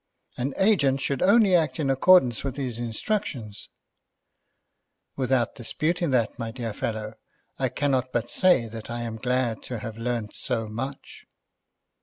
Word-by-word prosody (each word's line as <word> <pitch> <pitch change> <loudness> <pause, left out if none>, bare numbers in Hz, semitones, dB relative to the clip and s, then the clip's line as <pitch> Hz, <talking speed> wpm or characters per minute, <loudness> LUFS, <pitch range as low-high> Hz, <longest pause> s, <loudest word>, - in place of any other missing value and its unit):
"An 135 +3 -3
agent 145 -10 +3
should 135 -1 -1
only 200 -1 +5
act 160 -2 +1
in 140 -3 +1
accordance 135 -4 +5
with 135 -2 -3
his 125 -4 -3
instructions." 120 - -3 1.5
"Without 130 -3 +1
disputing 165 +8 -1
that, 120 -4 +1
my 115 -1 -3
dear 115 -2 -5
fellow, 110 +1 -4 0.5
I - - +1
cannot 130 -3 0
but 120 0 -1
say 135 -4 +3
that 110 0 -9
I 120 0 -3
am 115 -1 -4
glad 125 -2 0
to 125 - -4
have 110 +1 -7
learned 115 -2 -2
so 115 -4 -2
much." 130 +6 -7
125 Hz, 145 wpm, -26 LUFS, 115-140 Hz, 1.5 s, only